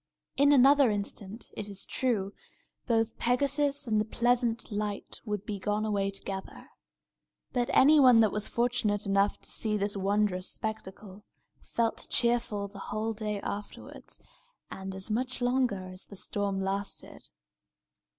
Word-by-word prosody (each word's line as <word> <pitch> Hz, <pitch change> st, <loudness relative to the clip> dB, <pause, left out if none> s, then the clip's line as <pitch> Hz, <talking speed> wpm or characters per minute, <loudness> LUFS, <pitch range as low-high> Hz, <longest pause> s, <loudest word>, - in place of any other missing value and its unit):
In 285 Hz, +1 st, +5 dB
another 275 Hz, -1 st, +6 dB
instant, 205 Hz, +1 st, -4 dB
it 205 Hz, -1 st, -4 dB
is 200 Hz, -1 st, -2 dB
true, 210 Hz, -6 st, -1 dB, 0.5 s
both 225 Hz, -2 st, +1 dB
Pegasus 280 Hz, +3 st, +1 dB
and 215 Hz, -3 st, +2 dB
the -, -, -1 dB
pleasant 240 Hz, 0 st, 0 dB
light 205 Hz, 0 st, -3 dB
would 210 Hz, -2 st, -3 dB
be 205 Hz, -3 st, -4 dB
gone 210 Hz, +2 st, -1 dB
away 200 Hz, -2 st, 0 dB
together. 195 Hz, -1 st, -6 dB, 0.8 s
But 245 Hz, -1 st, 0 dB
anyone 265 Hz, -4 st, +7 dB
that 215 Hz, -3 st, +3 dB
was 210 Hz, 0 st, -1 dB
fortunate 235 Hz, -4 st, 0 dB
enough 200 Hz, +1 st, +2 dB
to -, -, -9 dB
see 215 Hz, -1 st, 0 dB
this 205 Hz, 0 st, -1 dB
wondrous 195 Hz, -1 st, 0 dB
spectacle 210 Hz, -2 st, -6 dB, 0.4 s
felt 230 Hz, -1 st, -2 dB
cheerful 235 Hz, -4 st, +1 dB
the 200 Hz, 0 st, -12 dB
whole 220 Hz, +1 st, -2 dB
day 210 Hz, -2 st, -3 dB
afterward, 205 Hz, +1 st, -7 dB, 0.7 s
and 190 Hz, 0 st, -6 dB
as 190 Hz, +3 st, -3 dB
much 250 Hz, +3 st, 0 dB
longer 245 Hz, -7 st, 0 dB
as 185 Hz, 0 st, -9 dB
the 200 Hz, -, -11 dB
storm 200 Hz, 0 st, -2 dB
lasted. 195 Hz, +1 st, -4 dB
210 Hz, 140 wpm, -29 LUFS, 200-240 Hz, 0.8 s, anyone